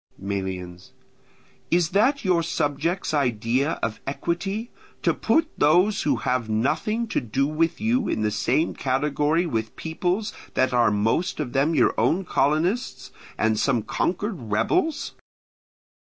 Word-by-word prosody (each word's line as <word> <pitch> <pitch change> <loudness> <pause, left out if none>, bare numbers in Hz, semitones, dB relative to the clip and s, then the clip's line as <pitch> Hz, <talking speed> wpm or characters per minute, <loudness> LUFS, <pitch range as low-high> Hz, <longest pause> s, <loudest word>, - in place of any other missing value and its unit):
Melians. 95 -2 -5 0.8
Is 170 -2 +2
that 235 +8 +2
your 180 -3 +3
subjects' 160 +3 -1
idea 130 +2 +1
of 110 - -2
equity, 195 - -3 0.3
to - - +3
put 320 0 +2
those 180 +8 +4
who 145 -3 +1
have 125 -1 -1
nothing 145 - 0
to - - 0
do 130 +3 0
with 155 +3 0
you 230 +4 +1
in 110 - -1
the 105 - +1
same 150 +9 +1
category 150 +5 0
with 110 -8 -3
peoples 180 +6 -2 0.2
that 130 0 +2
are 120 -2 +4
most 110 - 0
of 135 -5 -3
them 145 +4 +2
your 125 - +4
own 160 +12 +2
colonists, 150 - 0 0.3
and 110 -1 +1
some 120 -2 +1
conquered 180 - -2
rebels? 320 - 0
145 Hz, 135 wpm, -24 LUFS, 115-180 Hz, 0.8 s, those